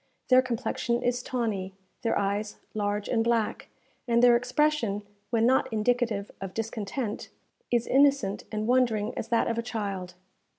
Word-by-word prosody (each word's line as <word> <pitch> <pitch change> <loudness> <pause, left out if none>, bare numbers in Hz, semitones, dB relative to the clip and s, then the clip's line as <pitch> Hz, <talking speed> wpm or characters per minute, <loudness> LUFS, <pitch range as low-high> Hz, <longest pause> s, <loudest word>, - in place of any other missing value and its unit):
Their 255 0 +7
complexion 240 -1 -2
is 245 0 +1
tawny, 210 -7 -2 0.3
their 230 - +1
eyes 205 +1 -1 0.2
large 205 -1 -1
and 225 -2 +1
black, 230 -2 0 0.4
and 235 0 +3
their 245 -1 +7
expression, 250 -4 +1 0.3
when 230 -1 +2
not 260 0 +3
indicative 220 -2 0
of 195 -1 -6
discontent, 225 +1 -3 0.4
is 240 -1 +1
innocent 275 -7 +3
and 215 0 -2
wondering 235 -3 +2
as - - -4
that 230 - +2
of 230 0 -1
a - - +1
child. 200 -6 -4
230 Hz, 145 wpm, -28 LUFS, 210-245 Hz, 0.4 s, Their